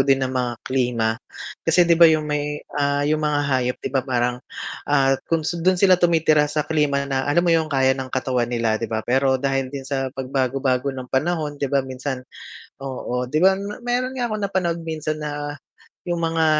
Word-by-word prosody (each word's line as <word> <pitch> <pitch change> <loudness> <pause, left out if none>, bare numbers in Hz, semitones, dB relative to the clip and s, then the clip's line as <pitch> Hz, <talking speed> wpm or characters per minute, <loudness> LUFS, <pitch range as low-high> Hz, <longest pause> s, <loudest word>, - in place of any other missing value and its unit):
din 135 0 +3
ng 130 - -3
mga 125 -2 -1
klima. 120 -4 +1 0.5
Kasi, 175 +2 +4
'di 170 - +3
ba, 170 0 +8
yung 155 -1 +2
may, 150 0 -3
ah, 145 0 +1
yung 155 +1 +1
mga 150 -1 +1
hayop, 130 -2 0
'di 130 - -6
ba, 135 - +2
parang, 125 -1 -1 0.5
ah, 135 -2 +4 0.2
kung 165 -2 +1
s 170 +1 -2
dun 185 +2 +3
sila 185 -1 +4
tumitira 160 -3 +3
sa 150 0 -1
klima 145 -3 +1
na 135 0 -2
alam 175 +4 +3
mo 170 - +3
yung 160 -1 +2
kaya 135 -2 +3
ng 130 -1 -5
katawan 130 -2 -1
nila, 115 -2 0
'di 115 - -3
ba. 110 0 -3
Pero 130 +1 +2
dahil 135 0 -1
din 135 0 -7
sa 135 0 -2
pagbago-bago 130 0 0
ng 130 -2 -6
panahon, 150 0 -1
'di 140 - 0
ba 140 -1 +1
minsan 130 0 -5 0.6
oo, 125 -2 -3
'di 155 +6 0
ba 190 - +7
m 200 +1 -5
meron 250 +2 -1
nga 240 -3 -2
akong 215 - -2
napanood 175 -3 -1
minsan 155 -1 -3
na 145 -1 -5 0.5
yung 175 -1 -1
mga, 165 -1 +1
140 Hz, 205 wpm, -22 LUFS, 130-160 Hz, 0.6 s, ba